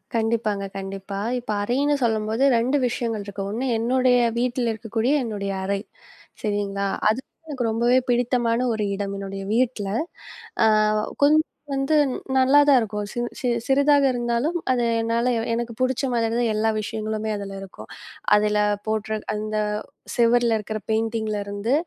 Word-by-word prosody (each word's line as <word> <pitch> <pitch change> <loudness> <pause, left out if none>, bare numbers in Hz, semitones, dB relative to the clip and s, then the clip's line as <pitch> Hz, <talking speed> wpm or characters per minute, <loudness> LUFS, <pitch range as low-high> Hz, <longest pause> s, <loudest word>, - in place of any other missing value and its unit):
கண்டிப்பாங்க. 220 -3 0
கண்டிப்பா 195 0 -5 0.2
இப்ப 240 - -5
அறைன்னு 280 +7 +1
சொல்லும்போது 220 +1 0
2 250 +5 +2
விஷயங்கள் 230 -3 -2
இருக்கு. 200 -1 -5
ஒண்ணு 235 +5 -2
என்னுடைய 250 +2 +3 0.2
வீட்ல 245 0 0
இருக்கக்கூடிய 225 +4 -1
என்னுடைய 200 -3 -3
அறை. 200 0 -1 0.6
சரிங்களா? 200 -2 -1 0.2
அது 220 +4 +1 0.3
எனக்கு 275 -6 -4
ரொம்பவே 240 +3 +3
பிடித்தமான 240 -1 +1
ஒரு 215 -1 -1
இடம். 200 0 -3
என்னுடைய 195 0 -5
வீட்ல 235 -4 0 0.8
அ - - +6 0.6
கொஞ்சம் 310 +2 +5 0.3
வந்து 270 +3 +1 0.4
நல்லா 265 +2 +6
தான் 280 -2 +7
இருக்கும். 210 -2 -3 0.3
சிறி 245 -2 0
சிறிதாக 280 +1 +4
இருந்தாலும் 240 +7 0
அதை 245 -2 +1 0.2
என்னால 230 +2 +1 0.2
எனக்குப் 235 0 -4
பிடிச்ச 255 +1 +1
மாரிதான் 230 0 +1
எல்லா 220 +1 +2
விஷயங்களுமே 215 0 -3
அதுல 200 -1 -6
இருக்கும். 180 - -11 0.5
அதுல 210 0 +2 0.3
போட்டிரு 220 0 -1 0.2
அந்த 215 0 -3 0.6
செவுருல 235 -1 +3
இருக்கிற 215 0 -4
பெயிண்டிங்ல 220 -1 -1
இருந்து 205 +4 -2
225 Hz, 130 wpm, -23 LUFS, 210-245 Hz, 0.8 s, தான்